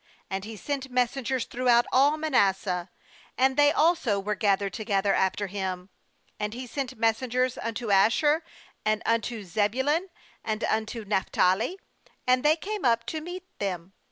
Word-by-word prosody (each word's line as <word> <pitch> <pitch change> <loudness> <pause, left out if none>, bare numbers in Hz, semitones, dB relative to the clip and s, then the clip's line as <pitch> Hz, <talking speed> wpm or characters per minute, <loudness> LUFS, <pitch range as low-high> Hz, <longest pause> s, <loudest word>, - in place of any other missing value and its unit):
35And 195 0 -2
he 220 0 -7
sent 270 +2 -4
messengers 250 0 0
throughout 240 -1 +3
all 285 +4 +4
Manasseh; 195 - +1 0.5
and 265 +1 +3
they 290 +1 +5
also 310 - +2
were 205 +2 -2
gathered 200 -1 +1
together 200 -2 0
after 190 +2 +1
him; 190 -1 -4 0.5
and 210 +1 -3
he 255 +1 -6
sent 260 0 -5
messengers 245 +3 +1
un 230 -1 -4
to 220 -2 -3
Asher, 295 - +4 0.4
and 215 0 0
unto 230 -1 0
Zebulun, 260 - 0 0.4
and 220 0 -2
unto 220 0 -1
Naphtali; 195 - +1 0.5
and 255 0 +3
they 300 +1 +5
came 415 +5 -5
up 230 -2 +2
to 315 - -4
meet 355 +3 -7 0.2
them. 185 -2 -4
230 Hz, 150 wpm, -27 LUFS, 200-265 Hz, 0.5 s, they